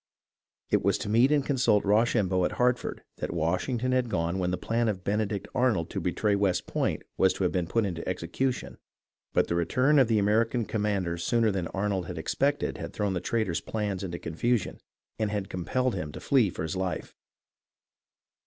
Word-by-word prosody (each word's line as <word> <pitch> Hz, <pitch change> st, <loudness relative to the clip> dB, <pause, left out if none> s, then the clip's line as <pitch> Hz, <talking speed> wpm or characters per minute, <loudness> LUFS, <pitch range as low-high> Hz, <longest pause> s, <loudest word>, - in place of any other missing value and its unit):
It -, -, +3 dB
was -, -, +3 dB
to -, -, -5 dB
meet 120 Hz, +6 st, +4 dB
and 145 Hz, -2 st, +2 dB
consult 125 Hz, -7 st, +2 dB
Rochambeau 105 Hz, -3 st, +2 dB
at -, -, 0 dB
Hartford 125 Hz, 0 st, 0 dB
that -, -, -3 dB
Washington 95 Hz, -, 0 dB
had 130 Hz, -2 st, +1 dB
gone 85 Hz, -1 st, -1 dB
when 90 Hz, -1 st, 0 dB
the 90 Hz, -, -1 dB
plan 115 Hz, +1 st, 0 dB
of 95 Hz, -4 st, -2 dB
Benedict 105 Hz, 0 st, -1 dB
Arnold 120 Hz, -10 st, +1 dB
to -, -, -2 dB
betray 105 Hz, -1 st, +1 dB
West 100 Hz, -3 st, +1 dB
Point -, -, -1 dB
was 95 Hz, -, +4 dB
to -, -, -3 dB
have 90 Hz, -, +2 dB
been 90 Hz, -3 st, -1 dB
put 115 Hz, +4 st, +1 dB
into 85 Hz, -3 st, -4 dB
execution, 105 Hz, +9 st, -2 dB, 0.5 s
but -, -, +3 dB
the -, -, -1 dB
return 130 Hz, -, +3 dB
of 130 Hz, -, +5 dB
the 110 Hz, -1 st, +2 dB
American 110 Hz, +3 st, +2 dB
commander 100 Hz, -6 st, -1 dB
sooner 115 Hz, +4 st, +2 dB
than 95 Hz, -3 st, -2 dB
Arnold 95 Hz, -2 st, -2 dB
had 90 Hz, -, -6 dB
expected 140 Hz, -, 0 dB
had -, -, -6 dB
thrown 105 Hz, -2 st, -1 dB
the 90 Hz, -, -2 dB
traitor's 105 Hz, -3 st, -1 dB
plans 100 Hz, -3 st, -3 dB
into 85 Hz, -2 st, -4 dB
confusion, 105 Hz, +8 st, -1 dB, 0.4 s
and 110 Hz, -1 st, +1 dB
had 100 Hz, -2 st, -3 dB
compelled 125 Hz, +8 st, -1 dB
him 75 Hz, -1 st, -4 dB
to -, -, -7 dB
flee 130 Hz, -8 st, +3 dB
for 80 Hz, -, -5 dB
his 80 Hz, -, -3 dB
life. 95 Hz, -3 st, -3 dB
105 Hz, 190 wpm, -28 LUFS, 90-120 Hz, 0.5 s, of